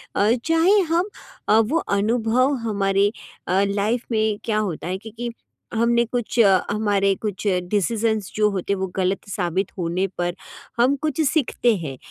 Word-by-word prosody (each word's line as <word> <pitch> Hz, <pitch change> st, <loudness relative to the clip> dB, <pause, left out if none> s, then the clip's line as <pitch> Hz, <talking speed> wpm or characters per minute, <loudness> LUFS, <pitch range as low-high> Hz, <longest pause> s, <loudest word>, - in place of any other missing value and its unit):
अ, 210 Hz, +2 st, +3 dB
चाहे 330 Hz, +6 st, +4 dB
हम 345 Hz, +3 st, 0 dB, 0.4 s
अ, 220 Hz, -, +6 dB
वो 230 Hz, +9 st, +1 dB, 0.2 s
अनुभव 235 Hz, +5 st, +2 dB
हमारे 200 Hz, 0 st, +2 dB, 0.4 s
लाइफ़ 200 Hz, +5 st, +1 dB
में 215 Hz, -2 st, +1 dB
क्या 215 Hz, -2 st, 0 dB
होता 190 Hz, -6 st, -2 dB
है 185 Hz, +1 st, -2 dB
कि 220 Hz, +3 st, -10 dB
कि 240 Hz, 0 st, -3 dB, 0.5 s
हमने 235 Hz, +1 st, +3 dB
कुछ 240 Hz, 0 st, -3 dB, 0.3 s
हमारे 205 Hz, -2 st, +2 dB
कुछ 210 Hz, -1 st, -4 dB, 0.2 s
डिसिज़ंस 215 Hz, 0 st, 0 dB
जो 210 Hz, 0 st, +3 dB
होते 195 Hz, +1 st, -2 dB
वो 190 Hz, 0 st, -2 dB
गलत 190 Hz, 0 st, -1 dB
साबित 185 Hz, 0 st, -1 dB
होने 175 Hz, +2 st, -1 dB
पर, 175 Hz, 0 st, -1 dB, 0.4 s
हम 255 Hz, +4 st, +4 dB
कुछ 305 Hz, +2 st, -2 dB
सीखते 245 Hz, -6 st, +1 dB
हैं। 140 Hz, -6 st, -6 dB
215 Hz, 150 wpm, -22 LUFS, 195-235 Hz, 0.5 s, अ